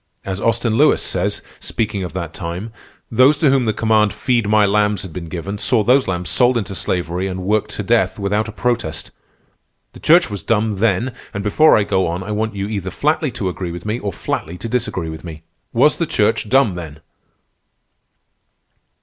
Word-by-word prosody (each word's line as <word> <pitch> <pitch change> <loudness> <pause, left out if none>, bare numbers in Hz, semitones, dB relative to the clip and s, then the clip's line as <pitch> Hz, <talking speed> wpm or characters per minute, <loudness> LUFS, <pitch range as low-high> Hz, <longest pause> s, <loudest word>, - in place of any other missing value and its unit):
As 95 0 -4
Austin 115 0 +1
Lewis - - +5
says, - - -2 0.2
speaking 105 -3 -2
of 90 - -6
that 85 -3 -5
time, 90 +5 -5 0.4
those 130 +5 +5
to 145 -2 +3
whom 135 -2 +2
the 110 - +2
command 110 -1 +2
'Feed 115 -1 0
my 105 -1 +5
lambs' 105 -1 +1
had 90 -4 -9
been 85 -1 -6
given, 95 +4 -5
saw 120 -1 +2
those 130 +5 +3
lambs 90 -1 -2
sold 125 +6 +3
into 100 -3 -3
slavery 90 0 -2
and 95 -1 -4
worked 105 +2 0
to 105 - -3
death 100 -3 +1
without 105 +2 0
a - - -6
protest. 105 - -2 0.8
The - - -12
Church 175 +3 +5
was 100 -4 -6
dumb, 110 +1 0
then, 115 +4 +1 0.2
and 100 - -3
before 155 +10 +5
I 105 - +3
go 95 -2 +1
on 85 +2 -3
I 105 - -6
want 110 0 -2
you 100 0 -3
either 100 -3 -3
flatly 150 - 0
to 100 - -3
agree 90 -1 -4
with 85 +2 -8
me 110 +3 -2
or 100 -3 -3
flatly 85 -1 -4
to 115 - -6
disagree 105 -8 -2
with 80 0 -8
me. 80 -2 -9 0.3
Was 140 +6 +4
the 170 - -1
Church 110 -6 +1
dumb 130 -6 +4
then?" 80 -3 -8
105 Hz, 195 wpm, -19 LUFS, 90-115 Hz, 0.8 s, Lewis